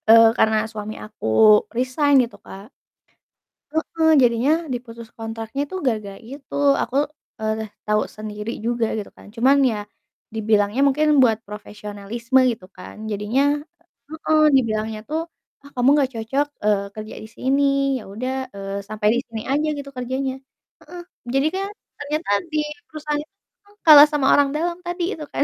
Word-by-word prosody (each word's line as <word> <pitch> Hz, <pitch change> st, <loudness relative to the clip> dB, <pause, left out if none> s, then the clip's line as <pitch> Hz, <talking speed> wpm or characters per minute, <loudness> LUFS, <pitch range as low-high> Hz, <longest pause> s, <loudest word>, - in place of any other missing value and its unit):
Eee, 225 Hz, 0 st, +8 dB
karena 220 Hz, 0 st, +3 dB
suami 215 Hz, -1 st, -6 dB
aku 215 Hz, -, -6 dB, 0.5 s
resign 270 Hz, +3 st, +2 dB
gitu, 235 Hz, -, -14 dB
Kak 195 Hz, +2 st, -12 dB, 1.0 s
Heeh. 320 Hz, +1 st, 0 dB
Jadinya 240 Hz, +3 st, +3 dB, 0.2 s
diputus 235 Hz, -2 st, -7 dB
kontraknya 225 Hz, +4 st, -4 dB
tuh 375 Hz, -, -3 dB
gara-gara 210 Hz, -5 st, -2 dB
itu. 265 Hz, +4 st, -10 dB, 0.3 s
Aku, 255 Hz, -, -7 dB, 0.5 s
eee, 220 Hz, 0 st, -2 dB, 0.2 s
tau 210 Hz, 0 st, +2 dB, 0.2 s
sendiri 210 Hz, +1 st, -5 dB
juga 235 Hz, -1 st, 0 dB
gitu 210 Hz, -, -5 dB
kan, -, -, -15 dB
cuman 260 Hz, +4 st, +4 dB
ya 215 Hz, -, -3 dB, 0.6 s
dibilangnya 215 Hz, +2 st, +1 dB
mungkin 300 Hz, +3 st, +2 dB, 0.2 s
buat 225 Hz, -3 st, +3 dB
profesionalisme 210 Hz, +4 st, -2 dB
gitu 220 Hz, -5 st, -8 dB
kan, -, -, -10 dB, 0.2 s
jadinya 210 Hz, +6 st, 0 dB, 0.7 s
heeh, 315 Hz, 0 st, +1 dB, 0.2 s
dibilangnya 220 Hz, -3 st, 0 dB
tuh, 310 Hz, +1 st, -1 dB, 0.4 s
"Ah, 280 Hz, -, -13 dB
kamu 250 Hz, +1 st, +3 dB
gak 265 Hz, -1 st, 0 dB
cocok," 265 Hz, +6 st, -1 dB, 0.2 s
eee, 205 Hz, -2 st, +2 dB
"kerja 215 Hz, 0 st, -8 dB
di -, -, -9 dB
sini. 270 Hz, +2 st, +1 dB, 0.4 s
Ya -, -, -10 dB
udah," 255 Hz, +5 st, -3 dB, 0.2 s
eee, 195 Hz, 0 st, -5 dB
"sampai 215 Hz, 0 st, -1 dB
di -, -, +1 dB
sini 225 Hz, -1 st, -6 dB
aja," 295 Hz, +3 st, +1 dB
gitu, 280 Hz, -1 st, -7 dB
"kerjanya." 260 Hz, +2 st, -2 dB, 0.5 s
Heeh. 355 Hz, 0 st, -10 dB, 0.3 s
Jadi 270 Hz, +2 st, +3 dB
kan 390 Hz, +1 st, -2 dB, 0.3 s
ternyata 300 Hz, +3 st, -3 dB, 0.2 s
di 305 Hz, -, +2 dB, 0.3 s
perusahaan 300 Hz, -1 st, -3 dB
itu 310 Hz, -, -27 dB, 0.3 s
tuh 410 Hz, 0 st, -24 dB
kalah 300 Hz, -2 st, +10 dB
sama 290 Hz, -3 st, +1 dB
orang 285 Hz, -1 st, +4 dB
dalam 340 Hz, +2 st, -1 dB
tadi 350 Hz, 0 st, -3 dB
itu 310 Hz, -, -8 dB
kan. -, -, +1 dB
240 Hz, 155 wpm, -22 LUFS, 215-285 Hz, 1.0 s, kalah